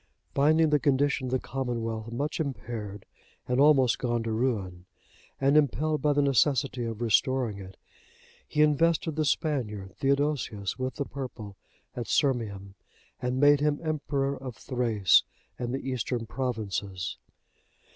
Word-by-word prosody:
Finding 155 Hz, +3 st, +4 dB
the 150 Hz, -, +4 dB
condition 140 Hz, -1 st, +1 dB
of -, -, -4 dB
the 130 Hz, -, +3 dB
commonwealth 115 Hz, -4 st, -4 dB
much 145 Hz, +8 st, -2 dB
impaired, 110 Hz, -8 st, -5 dB, 0.4 s
and 125 Hz, +1 st, +1 dB
almost 135 Hz, -4 st, +5 dB
gone 120 Hz, -2 st, -1 dB
to 115 Hz, -, -3 dB
ruin, 105 Hz, -7 st, -2 dB, 0.5 s
and 135 Hz, +2 st, +3 dB
impelled 150 Hz, +1 st, +2 dB
by 150 Hz, -, +3 dB
the 145 Hz, 0 st, +2 dB
necessity 135 Hz, -2 st, +2 dB
of 115 Hz, 0 st, -4 dB
restoring 120 Hz, -1 st, +1 dB
it, 95 Hz, -1 st, -11 dB, 0.7 s
he 150 Hz, -, +3 dB
invested 160 Hz, +1 st, +2 dB
the 155 Hz, -1 st, 0 dB
Spaniard, 105 Hz, -, -1 dB
Theodosius, 135 Hz, -8 st, 0 dB
with 130 Hz, 0 st, -2 dB
the 140 Hz, -, -2 dB
purple 120 Hz, -8 st, -7 dB, 0.4 s
at 120 Hz, -2 st, -4 dB
Sirmium, 105 Hz, -8 st, 0 dB, 0.5 s
and 125 Hz, +1 st, -1 dB
made 145 Hz, 0 st, +6 dB
him 150 Hz, 0 st, +1 dB
emperor 140 Hz, -3 st, -1 dB
of 130 Hz, -3 st, -7 dB
Thrace 115 Hz, -8 st, +3 dB, 0.4 s
and 120 Hz, -1 st, -2 dB
the 135 Hz, +1 st, -4 dB
Eastern 125 Hz, -2 st, -2 dB
provinces. 105 Hz, -7 st, -3 dB
130 Hz, 135 wpm, -28 LUFS, 115-145 Hz, 0.7 s, made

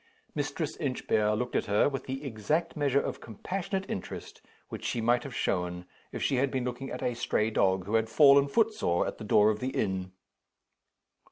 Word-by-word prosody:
Mistress -, -, -3 dB
Inchbare 105 Hz, 0 st, 0 dB
looked 125 Hz, +2 st, -3 dB
at -, -, 0 dB
her, 105 Hz, +1 st, +3 dB
with 135 Hz, -2 st, -3 dB
the 135 Hz, +2 st, -5 dB
exact 140 Hz, +8 st, -1 dB
measure 140 Hz, -3 st, +2 dB
of -, -, -4 dB
compassionate 190 Hz, -, -4 dB
interest 95 Hz, -, -6 dB, 0.3 s
which -, -, -7 dB
she -, -, -1 dB
might 120 Hz, +2 st, +2 dB
have 135 Hz, -4 st, -7 dB
shown 90 Hz, -6 st, -1 dB, 0.3 s
if -, -, -4 dB
she 135 Hz, -, +1 dB
had 135 Hz, +2 st, +2 dB
been 130 Hz, -1 st, -2 dB
looking 125 Hz, +2 st, -4 dB
at -, -, -5 dB
a 125 Hz, -, 0 dB
stray 110 Hz, -1 st, 0 dB
dog 95 Hz, -3 st, +2 dB
who 105 Hz, -, -5 dB
had 110 Hz, 0 st, +2 dB
fallen 140 Hz, +1 st, +6 dB
footsore 210 Hz, -, +1 dB
at -, -, -5 dB
the -, -, -6 dB
door 105 Hz, 0 st, +5 dB
of 105 Hz, -, -4 dB
the 130 Hz, -, -2 dB
inn. 95 Hz, -6 st, -2 dB
120 Hz, 190 wpm, -29 LUFS, 105-140 Hz, 0.3 s, fallen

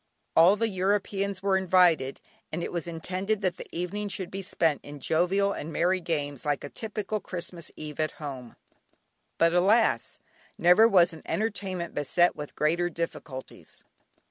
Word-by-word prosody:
All 170 Hz, +5 st, +7 dB
the 230 Hz, +2 st, 0 dB
Europeans 195 Hz, 0 st, -1 dB
were 195 Hz, -1 st, +3 dB
invited, 180 Hz, -7 st, +3 dB, 0.3 s
and 170 Hz, +2 st, -3 dB
it -, -, -4 dB
was 175 Hz, -1 st, -3 dB
intended 185 Hz, +5 st, -2 dB
that 185 Hz, -3 st, 0 dB
the -, -, -8 dB
evening 200 Hz, +4 st, -3 dB
should 190 Hz, -2 st, -5 dB
be 195 Hz, -, -4 dB
spent 165 Hz, -6 st, 0 dB
in 145 Hz, 0 st, -9 dB
jovial 185 Hz, +7 st, +1 dB
and 155 Hz, -, -6 dB
merry 180 Hz, +3 st, +1 dB
games 145 Hz, -6 st, -3 dB
like 145 Hz, -1 st, -1 dB
a 145 Hz, -, -6 dB
typical 215 Hz, +1 st, -4 dB
Christmas 175 Hz, -3 st, -6 dB
eve 150 Hz, -1 st, -8 dB
at 155 Hz, 0 st, 0 dB
home. 130 Hz, -5 st, -8 dB, 0.8 s
But 165 Hz, 0 st, +4 dB
alas! 200 Hz, +6 st, +3 dB, 0.4 s
never 180 Hz, +6 st, +6 dB
was 180 Hz, -5 st, +4 dB
an 160 Hz, -, -10 dB
entertainment 195 Hz, -5 st, -2 dB
beset 175 Hz, +5 st, +2 dB
with 150 Hz, -1 st, -8 dB
greater 170 Hz, +3 st, +1 dB
difficulties. 155 Hz, -5 st, -7 dB
175 Hz, 155 wpm, -27 LUFS, 160-195 Hz, 0.8 s, All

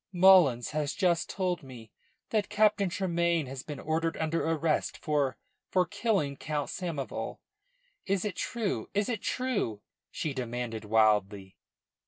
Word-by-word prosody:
"Mullins 175 Hz, -10 st, +6 dB
has 150 Hz, -2 st, -1 dB
just 175 Hz, -4 st, +1 dB
told 180 Hz, -2 st, -1 dB
me 120 Hz, -6 st, -12 dB, 0.4 s
that 210 Hz, -2 st, +1 dB
Captain 210 Hz, -2 st, +3 dB
Tremayne 170 Hz, -3 st, +1 dB
has 130 Hz, 0 st, -6 dB
been 145 Hz, 0 st, -7 dB
ordered 165 Hz, +1 st, -1 dB
under 160 Hz, +1 st, 0 dB
arrest 160 Hz, -1 st, 0 dB
for 145 Hz, -4 st, 0 dB, 0.3 s
for 185 Hz, -1 st, +3 dB
killing 195 Hz, -, 0 dB
Count 150 Hz, 0 st, -3 dB
Samoval. 165 Hz, -7 st, -4 dB, 0.7 s
Is 195 Hz, 0 st, +1 dB
it 200 Hz, -4 st, -2 dB
true? 225 Hz, 0 st, -2 dB
Is 205 Hz, +2 st, +1 dB
it 225 Hz, -4 st, -2 dB
true?" 210 Hz, -, -1 dB, 0.3 s
she 155 Hz, -4 st, -3 dB
demanded 120 Hz, -3 st, -4 dB
wildly. 105 Hz, -3 st, +2 dB
160 Hz, 135 wpm, -29 LUFS, 130-190 Hz, 0.7 s, Mullins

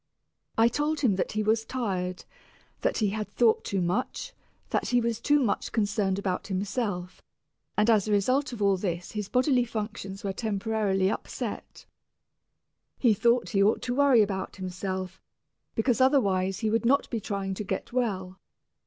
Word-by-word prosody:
I 225 Hz, +1 st, +6 dB
told 295 Hz, +5 st, -1 dB
him 230 Hz, -9 st, +3 dB
that 190 Hz, -, -1 dB
he 215 Hz, 0 st, 0 dB
was 220 Hz, +1 st, +2 dB
tired, 190 Hz, -7 st, -3 dB, 0.5 s
that -, -, 0 dB
he 210 Hz, -3 st, +2 dB
had 215 Hz, +1 st, -3 dB
thought 225 Hz, +2 st, +3 dB
too 195 Hz, -2 st, -1 dB
much, 235 Hz, -, -2 dB, 0.4 s
that -, -, 0 dB
he 245 Hz, -, +3 dB
was 230 Hz, -1 st, -1 dB
too 295 Hz, +3 st, +4 dB
much 235 Hz, -7 st, 0 dB
concerned 200 Hz, -3 st, 0 dB
about 190 Hz, -2 st, -2 dB
himself, 195 Hz, -2 st, -3 dB, 0.6 s
and 210 Hz, +1 st, +3 dB
that 230 Hz, -, +6 dB
as 210 Hz, -1 st, +2 dB
a -, -, -1 dB
result 255 Hz, +8 st, +2 dB
of 225 Hz, -4 st, -3 dB
all 200 Hz, -1 st, +4 dB
this 175 Hz, -2 st, -3 dB
his 210 Hz, -2 st, -4 dB
bodily 255 Hz, 0 st, +3 dB
functions 210 Hz, -4 st, -5 dB
were 195 Hz, -1 st, -2 dB
temporarily 200 Hz, -2 st, 0 dB
upset. -, -, -6 dB, 1.1 s
He 235 Hz, -4 st, +4 dB
thought 235 Hz, +3 st, +2 dB
he 195 Hz, -3 st, +2 dB
ought 205 Hz, +2 st, +3 dB
to 245 Hz, -, -1 dB
worry 275 Hz, -5 st, +5 dB
about 190 Hz, -2 st, -3 dB
himself, 185 Hz, 0 st, -5 dB, 0.5 s
because 235 Hz, +1 st, +1 dB
otherwise 195 Hz, -8 st, +2 dB
he 220 Hz, -1 st, +1 dB
would 225 Hz, +2 st, +1 dB
not 270 Hz, +4 st, +3 dB
be 230 Hz, -, -1 dB
trying 195 Hz, -2 st, -3 dB
to 200 Hz, -, -4 dB
get 190 Hz, +3 st, -4 dB
well. 190 Hz, -7 st, -2 dB
210 Hz, 170 wpm, -27 LUFS, 190-235 Hz, 1.1 s, I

